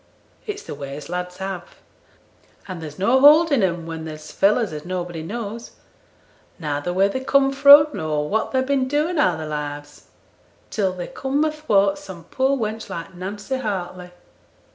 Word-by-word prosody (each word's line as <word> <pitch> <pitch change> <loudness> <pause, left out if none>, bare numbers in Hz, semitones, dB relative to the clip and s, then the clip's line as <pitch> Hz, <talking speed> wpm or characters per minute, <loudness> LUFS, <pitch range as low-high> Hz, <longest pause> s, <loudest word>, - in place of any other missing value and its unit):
It's 415 -1 -5
the - - -7
way 140 -1 -7
as 150 - -10
lads 180 0 -4
have; 190 -2 -6 0.9
and 185 -4 -6
there's 150 -2 -8
no 235 +8 +3
holding 295 -1 +6
'em 175 -3 0
when 165 -1 -6
they're 155 -1 -6
fellows 200 +6 +1
as 150 -1 -6
nobody 175 -2 -4
knows 225 +5 -6 0.8
neither 150 0 -3
where 190 +2 +3
they 230 +6 -3
come 275 0 +3
fro', 285 +2 +8
nor 155 -6 -2
what 220 +6 -1
they've 260 -1 +1
been 270 -1 +1
doing 300 +4 0
a' 180 - +3
their 160 - -5
lives, 145 -1 -6 0.7
till 195 -4 0
they 180 -1 -6
come 275 +3 -1
athwart 210 -11 +1
some 175 -3 -10
poor 265 +7 0
wench 220 -2 -4
like 170 +3 -6
Nancy 200 +8 -5
Hartley. 185 -6 -4
195 Hz, 165 wpm, -22 LUFS, 165-260 Hz, 0.9 s, fro